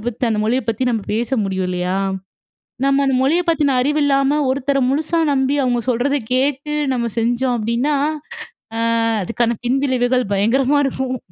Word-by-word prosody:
அத -, -, -12 dB
பத்தி 240 Hz, +1 st, -2 dB
அந்த 220 Hz, -, 0 dB
மொழிய 245 Hz, +4 st, +1 dB
பத்தி 230 Hz, +3 st, -1 dB
நம்ம 225 Hz, -3 st, -1 dB
பேச 235 Hz, +3 st, -2 dB
முடியும் 190 Hz, -1 st, -2 dB
இல்லையா? 180 Hz, +1 st, -2 dB, 0.9 s
நம்ம 275 Hz, 0 st, +3 dB
அந்த 270 Hz, -, +1 dB
மொழிய 320 Hz, +7 st, +2 dB
பத்தின 295 Hz, -5 st, +2 dB
அறிவு 295 Hz, +3 st, +1 dB
இல்லாம, 275 Hz, +1 st, +2 dB
ஒருத்தர 275 Hz, +1 st, 0 dB
முழுசா 315 Hz, +4 st, 0 dB
நம்பி, 270 Hz, +1 st, +1 dB
அவங்க 245 Hz, -2 st, +1 dB
சொல்றத 260 Hz, +4 st, +1 dB, 0.2 s
கேட்டு 275 Hz, +3 st, 0 dB, 0.2 s
நம்ம 235 Hz, -2 st, -1 dB
செஞ்சோம் 245 Hz, +2 st, 0 dB
அப்படின்னா, 235 Hz, +7 st, 0 dB, 0.8 s
அ -, -, -2 dB, 0.4 s
அதுக்கான 235 Hz, +3 st, 0 dB
பின்விளைவுகள் 255 Hz, -2 st, +1 dB
பயங்கரமா 260 Hz, +8 st, +2 dB
இருக்கும். 260 Hz, -1 st, -2 dB
255 Hz, 155 wpm, -19 LUFS, 235-275 Hz, 0.9 s, நம்ம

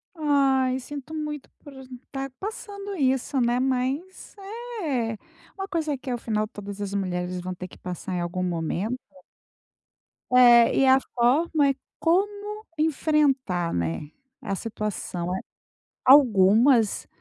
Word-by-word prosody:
Ai, 270 Hz, -4 st, +2 dB
sinto 285 Hz, +3 st, -8 dB
muito 300 Hz, -2 st, -5 dB
por 285 Hz, -, -13 dB, 0.4 s
tá 270 Hz, 0 st, -4 dB
passando 405 Hz, -1 st, -6 dB
isso, 265 Hz, -2 st, +1 dB
né. 240 Hz, +1 st, +2 dB
Mas, 265 Hz, +11 st, -2 dB, 0.5 s
é 235 Hz, -7 st, -1 dB, 0.4 s
uma 385 Hz, 0 st, -4 dB
coisa 315 Hz, -6 st, -1 dB
que 260 Hz, +1 st, -8 dB
afinal 220 Hz, -3 st, -1 dB
todas 205 Hz, -1 st, -8 dB
as 200 Hz, -1 st, -4 dB
mulheres 180 Hz, -2 st, -2 dB
vão 185 Hz, +1 st, -4 dB
ter 180 Hz, +1 st, -7 dB
que -, -, -16 dB
passar 180 Hz, +1 st, -6 dB
em 180 Hz, -, -1 dB
algum 175 Hz, +1 st, -2 dB
momento. 180 Hz, +7 st, -2 dB, 1.3 s
É, 240 Hz, -2 st, +7 dB
e 270 Hz, -, +5 dB
a 265 Hz, 0 st, +6 dB
forma 280 Hz, +5 st, +2 dB
é -, -, +2 dB, 0.3 s
como 410 Hz, +5 st, 0 dB
enfrentar, 280 Hz, -, +1 dB
né, 85 Hz, -, -2 dB, 0.3 s
a 195 Hz, -, -3 dB
situação. 195 Hz, -5 st, -4 dB
Eh, 190 Hz, -, -2 dB, 0.7 s
algumas 230 Hz, -2 st, +5 dB
255 Hz, 125 wpm, -25 LUFS, 200-295 Hz, 1.3 s, É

